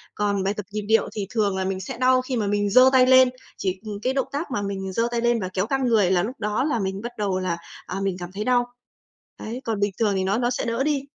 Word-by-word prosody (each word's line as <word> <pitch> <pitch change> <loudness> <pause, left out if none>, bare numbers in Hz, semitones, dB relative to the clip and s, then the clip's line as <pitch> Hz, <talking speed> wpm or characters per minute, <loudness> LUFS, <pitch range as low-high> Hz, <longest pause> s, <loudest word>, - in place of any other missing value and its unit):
Còn 200 -2 0
bài 195 - 0
tập 210 -2 -6
nhịp 210 0 -3
điệu 220 +2 +2
thì 205 -2 -3
thường 205 -4 0
là 190 - -1
mình 190 0 -2
sẽ 190 - -6
đau 255 +1 +4
khi 255 0 -4
mà 215 -3 0
mình 205 0 +1
giơ 255 +5 +7
tay 255 -1 +6
lên, 260 0 +7 0.3
chỉ, 185 -1 -2
ừm, 205 -1 -5
cái 255 +3 0
động 270 -1 0
tác 290 +2 -4
mà 225 -5 -1
mình 195 -1 -4
giơ 230 +3 +1
tay 235 - -1
lên 240 0 +2
và 185 -3 -3
kéo 190 +1 0
căng 270 -1 0
người 210 -6 +3
là 175 -2 +3
lúc 245 +4 -5
đó 210 +3 0
là 280 -6 0
mình 195 0 -3
bắt 240 +2 -5
đầu 195 -3 -1
là, 180 -2 -2 0.3
à, - - -6
mình 195 -2 -1
cảm 175 0 -7
thấy 205 +2 -4
đau. 245 0 +2 0.7
Đấy, 240 +4 -6
còn 220 -3 -1
bình 205 0 +1
thường 210 -3 +2
thì 190 - 0
nó 195 +4 +1
nó 240 0 +1
sẽ 245 - -2
đỡ 230 +3 0
đi. 290 -1 +1
210 Hz, 290 wpm, -24 LUFS, 195-250 Hz, 0.7 s, giơ